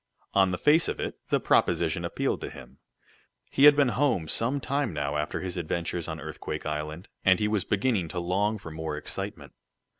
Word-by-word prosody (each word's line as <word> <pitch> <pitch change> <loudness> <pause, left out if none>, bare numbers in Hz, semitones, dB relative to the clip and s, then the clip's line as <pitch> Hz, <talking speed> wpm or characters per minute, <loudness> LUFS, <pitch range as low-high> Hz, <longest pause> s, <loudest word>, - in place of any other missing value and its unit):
On 95 -1 +4
the 90 - -1
face 155 - +4
of - - -3
it, - - -4
the - - +3
proposition - - +2
appealed - - -1
to - - -4
him. - - -13 0.7
He 140 - +5
had 145 -1 +9
been 140 -3 +4
home 120 - +1
some 120 - 0
time 140 -5 -1
now 75 -1 -2
after 75 0 -2
his 90 -1 -4
adventures 85 0 -2
on 80 -1 -5
Earthquake 80 0 -6
Island, 75 +5 -4 0.2
and 95 -1 +5
he 105 - +1
was 105 -3 0
beginning 100 -3 +1
to 90 - -4
long 100 +5 0
for 90 -6 -9
more 80 -1 -4
excitement. 75 - -6
90 Hz, 190 wpm, -27 LUFS, 80-115 Hz, 0.7 s, had